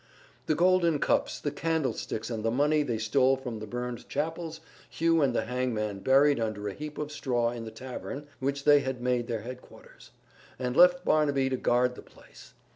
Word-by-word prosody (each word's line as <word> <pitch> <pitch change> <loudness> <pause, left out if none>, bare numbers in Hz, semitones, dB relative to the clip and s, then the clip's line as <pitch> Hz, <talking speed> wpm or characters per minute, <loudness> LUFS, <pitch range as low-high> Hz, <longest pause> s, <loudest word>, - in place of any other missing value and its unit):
The 155 - +2
golden 175 -2 +3
cups, - - 0
the 145 - -2
candlesticks 145 -7 -2
and 110 -2 -3
the 115 - +1
money 145 +5 +2
they 125 -6 -1
stole 130 +4 +2
from 125 -4 -6
the 110 - -7
burned 120 +1 -5
chapels 160 +2 -3 0.3
Hugh 165 0 +2
and 130 -4 +2
the - - 0
hangman 115 -5 -2
buried 140 +4 +4
under 110 -2 -3
a 100 - -3
heap 150 +3 -7
of 150 0 -4
straw 120 -5 0
in 120 -1 -6
the - - -6
tavern 130 +5 -7
which 140 +1 -2
they 145 0 +6
had 130 -2 -3
made 125 -1 0
their 115 -3 -3
headquarters, 125 +3 -12 0.5
and 125 -1 -3
left 180 +2 +6
Barnaby 140 -3 +2
to - - +1
guard 125 0 +2
the - - -11
place. - - -17
130 Hz, 190 wpm, -28 LUFS, 120-150 Hz, 0.5 s, they